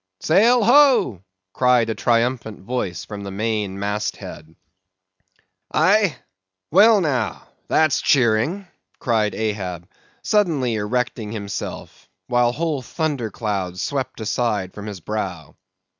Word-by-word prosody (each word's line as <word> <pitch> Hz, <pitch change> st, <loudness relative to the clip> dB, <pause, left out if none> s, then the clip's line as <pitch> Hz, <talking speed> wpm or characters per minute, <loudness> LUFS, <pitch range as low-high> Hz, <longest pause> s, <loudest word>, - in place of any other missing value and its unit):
"Sail 225 Hz, +8 st, +4 dB
ho!" 240 Hz, -, +5 dB, 0.3 s
cried 125 Hz, -3 st, +3 dB
a -, -, 0 dB
triumphant 115 Hz, -2 st, 0 dB
voice 95 Hz, -5 st, -3 dB
from 105 Hz, -1 st, -7 dB
the 100 Hz, -, -6 dB
main 105 Hz, -1 st, -2 dB
mast 105 Hz, +1 st, -2 dB
head. 80 Hz, +1 st, -10 dB, 1.2 s
"Aye? 185 Hz, 0 st, +3 dB, 0.6 s
Well, 205 Hz, +4 st, +6 dB
now, 125 Hz, -, -2 dB, 0.2 s
that's 155 Hz, -3 st, +2 dB
cheering," 130 Hz, -, +2 dB, 0.3 s
cried 110 Hz, -3 st, 0 dB
Ahab, 95 Hz, -6 st, -3 dB, 0.4 s
suddenly 160 Hz, -, +1 dB
erecting 110 Hz, 0 st, -2 dB
himself, 100 Hz, -2 st, -6 dB, 0.2 s
while 120 Hz, -1 st, +2 dB
whole 155 Hz, 0 st, -2 dB
thunder 140 Hz, -3 st, -2 dB
clouds 95 Hz, -5 st, -3 dB
swept 135 Hz, -4 st, -3 dB
aside 105 Hz, -4 st, -1 dB
from 105 Hz, 0 st, -8 dB
his 100 Hz, -4 st, -7 dB
brow. 95 Hz, -6 st, -5 dB
115 Hz, 115 wpm, -21 LUFS, 105-150 Hz, 1.2 s, Well